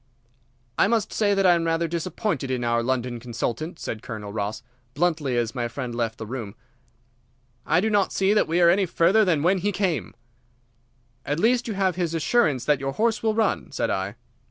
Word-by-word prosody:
"I - - +5
must 225 0 0
say 205 -2 +2
that 195 -1 +2
I 180 - +7
am 170 -1 0
rather 165 0 +1
disappointed 170 - -2
in 125 -2 -1
our 120 0 +1
London 125 -1 -2
consultant," 120 +7 -4
said 110 -8 -5
Colonel 105 -4 -7
Ross, 105 +1 -3 0.3
bluntly, 150 -5 0
as 115 -2 -1
my 120 -2 -2
friend 125 0 -5
left 115 -2 -2
the 110 - -6
room. 110 -3 -6 1.1
"I 160 +3 +3
do 220 - +1
not 205 -2 +2
see 195 +1 +2
that 210 - +3
we 170 +2 +1
are 170 - +7
any 190 +1 +2
further 185 +7 +3
than 165 -7 +1
when 185 +3 +3
he 205 +3 0
came." 175 - -2 1.1
"At 145 +2 -2
least 240 +4 +2
you 220 - -3
have 190 -3 0
his 170 -2 -1
assurance 160 - +1
that 150 -2 +2
your 135 0 -3
horse 225 +2 +1
will 220 -1 +1
run," 220 -2 0
said - - -1
I. 95 +2 -2
165 Hz, 200 wpm, -24 LUFS, 120-195 Hz, 1.1 s, I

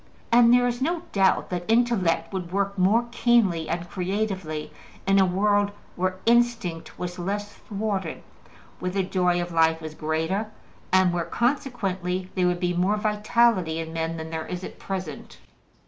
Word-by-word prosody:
And 235 0 +6
there 245 0 +5
is 245 +1 -2
no 335 +4 0
doubt 195 -1 +2
that 175 +2 -4
intellect 205 -8 +2
would 180 -3 -4
work 200 +1 0
more 205 +6 +3
keenly 225 -10 +2
and 170 +1 -2
creatively 185 -4 -3 0.3
in 195 0 +4
a 190 - +5
world 205 +2 +2 0.3
where 185 +1 0
instinct 235 -8 +1
was 180 0 -5
less 205 +3 -3
thwarted, 200 -5 -4 0.6
where 180 - -2
the 190 +1 0
joy 180 -1 +1
of 175 0 -3
life 160 -1 +3
was 155 -1 -7
greater, 160 +8 -1 0.4
and 185 -1 +4
where 170 -1 -1
consequently 190 -8 -1
there 180 -2 +2
would 175 0 0
be 180 -1 0
more 185 +4 +1
vitality 210 -4 +2
in 165 0 -5
men 165 0 -2
than 160 0 -6
there 160 -1 -4
is 180 0 -5
at - - -8
present. 185 -7 -6
185 Hz, 160 wpm, -25 LUFS, 175-210 Hz, 0.6 s, And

